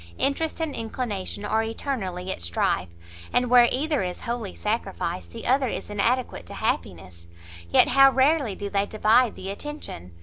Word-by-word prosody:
interest 310 +4 0
and 320 -3 -2
inclination 220 -4 -4
are 220 +1 +1
eternally 215 -6 -3
at - - -4
strife, 85 +1 0 0.4
and 245 0 +1
where 245 -1 +7
either 295 +2 +1
is 180 -1 -4
wholly 235 - -4
sacrificed, 85 +1 -3
the - - -8
other 265 +1 +3
is 215 - -5
inadequate 235 +5 0
to - - -8
happiness. 85 -1 -3 0.4
Yet - - +5
how 275 0 +7
rarely 265 -5 +2
do 205 - -5
they 200 0 0
divide 220 +3 +3
the 190 +1 -5
attention! 200 - -7
225 Hz, 160 wpm, -25 LUFS, 190-265 Hz, 0.4 s, where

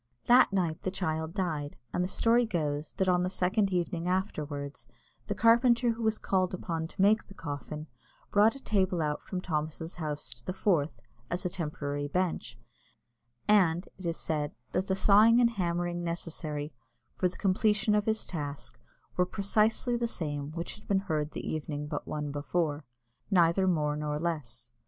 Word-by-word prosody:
That 245 -1 +6
night 175 -5 0
the - - -1
child 160 -3 -2
died, 155 -7 -2 0.2
and 180 - +1
the - - 0
story 230 +5 +3
goes 150 -6 -2
that 190 - 0
on 180 -1 +4
the 180 - 0
second 195 +2 +1
evening 175 -1 -1
afterwards, 150 -7 -2 0.4
the - - -1
carpenter 235 +1 +5
who 230 +1 -5
was 220 -1 +2
called 185 -1 0
upon 165 -2 -3
to 190 - -5
make 215 +2 +4
the 195 - -13
coffin 150 0 -5 0.5
brought 210 +3 +5
a 275 - -11
table 185 -5 +1
out 150 -1 -1
from 185 -2 -4
Thomas's 160 0 -3
house 150 -3 -2
to 120 - -14
the 185 - -3
Forth, 165 - +1 0.3
as 175 +1 -3
a 180 - 0
temporary 145 -4 -3
bench; 180 +3 -2 0.9
and, 185 -4 +4
it 185 - -4
is 165 - -1
said, 150 -2 -2 0.2
that 190 - 0
the 190 - +1
sawing 215 +4 +6
and 235 -1 +5
hammering 175 -3 -1
necessary 155 -3 -3 0.4
for 185 - +2
the 180 - -7
completion 210 +2 +2
of 210 0 +2
his 220 0 +1
task 145 -4 -6 0.4
were 180 - +4
precisely 215 +5 +1
the 235 0 0
same 145 -9 -3
which 170 +1 -5
had - - -19
been 195 -1 +3
heard 155 -6 -1
the - - -5
evening 150 -1 -3
but 150 0 -5
one 150 -1 -3
before 145 0 -1 0.4
neither 185 0 +4
more 150 -4 +1
nor 150 0 -2
less. 150 -8 -3
175 Hz, 175 wpm, -30 LUFS, 150-195 Hz, 0.9 s, That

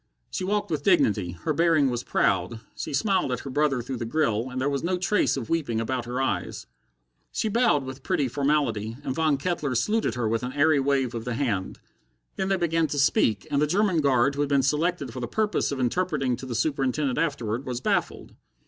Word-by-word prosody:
She - - -3
walked 205 0 -1
with 150 -3 -1
dignity, 105 - +2
her 155 - 0
bearing 155 -4 +3
was 120 0 -3
proud, 95 +4 0 0.2
she - - -5
smiled 185 - +1
at 125 - -2
her 135 - -7
brother 140 -3 +1
through 130 +1 -4
the 120 - -4
grill, 115 -3 0
and 130 0 -4
there 130 - 0
was 140 -1 -1
no 180 +2 0
trace 190 -3 +1
of 120 -5 -4
weeping 145 -9 -1
about 120 +1 -2
her 125 +2 -3
eyes. 135 - -2 0.7
She 220 - -1
bowed 225 - +3
with 130 0 -8
pretty 180 -8 0
formality, 125 -5 0
and 130 - -2
Von 155 -1 +1
Kettler 145 -4 -2
saluted 210 - +1
her 120 -3 -1
with 115 +1 0
an 125 +1 -4
airy 145 +1 +3
wave 135 -2 +1
of 115 -1 -4
the 125 0 -3
hand. 110 -9 -2 0.6
Then 190 - -2
they 195 - +2
began 165 -2 +1
to 145 - -4
speak, 110 -7 +2
and 140 0 +2
the 150 - +3
German 185 0 +2
guard 135 -1 +3
who 145 - -2
had 145 - 0
been 140 -2 +3
selected 150 -1 0
for 130 - -5
the 120 - -3
purpose 215 - 0
of 140 - -3
interpreting 130 -1 0
to 130 - -8
the 120 - -4
Superintendent 135 0 0
afterward, 130 -6 -2
was 125 -1 -3
baffled. - - -1
140 Hz, 215 wpm, -26 LUFS, 125-160 Hz, 0.7 s, bearing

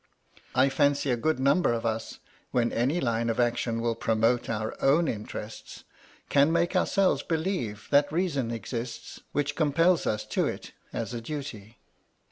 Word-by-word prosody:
I 130 +2 +5
fancy 140 0 +2
a - - +3
good 155 +5 0
number 140 +3 +3
of 115 0 -3
us, 110 0 -2 0.3
when 120 -1 +1
any 135 +9 +1
line 115 -3 0
of 115 - -1
action 120 -1 0
will 115 0 +1
promote 115 +2 +1
our 110 -1 -2
own 155 +5 +4
interest, 105 0 -6 0.4
can 145 +2 +4
make 170 +2 +1
ourselves 190 +1 +2
believe 160 - -2
that 145 0 +4
reasons 150 -8 0
exist 115 +1 -5
which 145 0 -1
compel 165 +4 +4
us 105 0 -1
to - - 0
it - - -6 0.2
as 115 +1 -4
a 120 - -4
duty. 115 -6 -7
125 Hz, 155 wpm, -27 LUFS, 115-150 Hz, 0.4 s, I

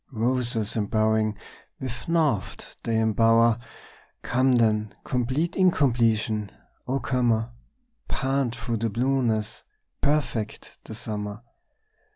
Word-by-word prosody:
Roses 120 -2 0
embowering 110 0 +1 0.4
with 120 -2 -6
naught 155 - 0
they 115 -1 0
embower! 115 +1 +4 0.6
Come 130 +1 +2
then, 110 -3 +2
complete 130 +7 -1
incompletion, 115 - +2 0.4
O 135 +2 0
comer, 120 -2 +1 0.6
Pant 135 -3 0
through 115 0 -3
the 115 +1 -1
blueness, 115 -2 0 0.4
perfect 140 -7 -1
the 110 - -8
summer! 105 -1 -5
115 Hz, 95 wpm, -25 LUFS, 110-130 Hz, 0.6 s, embower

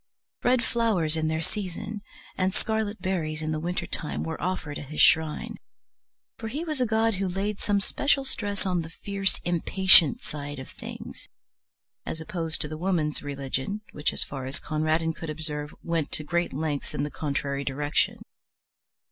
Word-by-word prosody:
Red 245 -1 +4
flowers 210 -10 +2
in 160 -1 +1
their 160 0 0
season 205 +2 -4 0.3
and 190 +1 +1
scarlet 220 -3 -1
berries 155 -5 -1
in 155 - -1
the 155 - 0
winter 175 +3 -1
time 150 - -2
were 160 0 -4
offered 180 -5 -2
at 145 - -7
his 155 +2 -5
shrine, 160 +8 +4 0.8
for 225 - -4
he 285 +9 -3
was 305 -5 -2
a 250 - +3
god 220 +1 +3
who 195 0 0
laid 195 +3 -1
some 205 -1 +2
special 275 +7 +2
stress 205 -6 -2
on 180 -2 +2
the 160 - -7
fierce 195 +3 0
impatient 175 -2 +6
side 145 -1 -5
of 130 - -8
things, - - -8 0.7
as 160 - -4
opposed 165 -2 -2
to - - -1
the 155 +1 -6
Woman's 170 -5 +1
religion, 140 +7 -2
which, 150 - +1
as - - +1
far 135 -2 -5
as 135 - -3
Conradin 155 +1 +1
could 165 0 -6
observe, 150 -1 -2
went 165 -3 0
to 155 - 0
great 170 +3 0
lengths 145 0 -2
in 140 - 0
the 145 - -2
contrary 140 -2 -1
direction. 145 +2 +1
165 Hz, 175 wpm, -27 LUFS, 150-200 Hz, 0.8 s, impatient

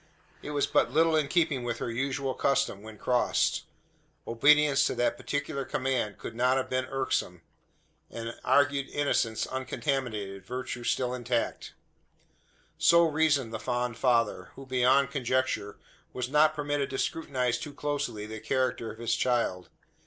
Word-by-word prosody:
It - - -7
was 145 -1 +1
but - - +2
little 160 +3 +3
in 155 -2 +2
keeping 155 -5 +1
with 120 -1 -2
her 120 - -3
usual 135 +2 -2
custom, 130 -8 0
when 110 0 -11
crossed. 125 +3 +1 0.6
Obedience 140 +3 +4
to - - -2
that 120 - +1
particular 145 -1 -3
command 130 -7 -1
could - - -7
not 125 +3 +2
have 130 -1 -3
been 130 0 0
irksome; 130 -10 -2 0.7
and 115 0 -6
argued 140 -1 +2
innocence 115 -6 0
uncontaminated, 125 -7 -3
virtue 125 +2 -5
still 125 +1 0
intact. 120 -1 -2 1.0
So 170 0 +6
reasoned 145 -6 +1
the 110 - -3
fond 120 +1 -2
father; 115 -7 +1
who, 135 - -10
beyond 130 +1 +3
conjecture, 130 -6 -1 0.4
was 125 -1 -3
not 155 +2 +4
permitted 145 -2 -1
to 135 - -4
scrutinise 125 -7 -1
too 145 -2 -7
closely 140 -8 -3
the 110 0 -7
character 120 -1 -1
of 110 - -12
his 115 0 0
child. 115 -8 0
130 Hz, 145 wpm, -28 LUFS, 115-140 Hz, 1.0 s, So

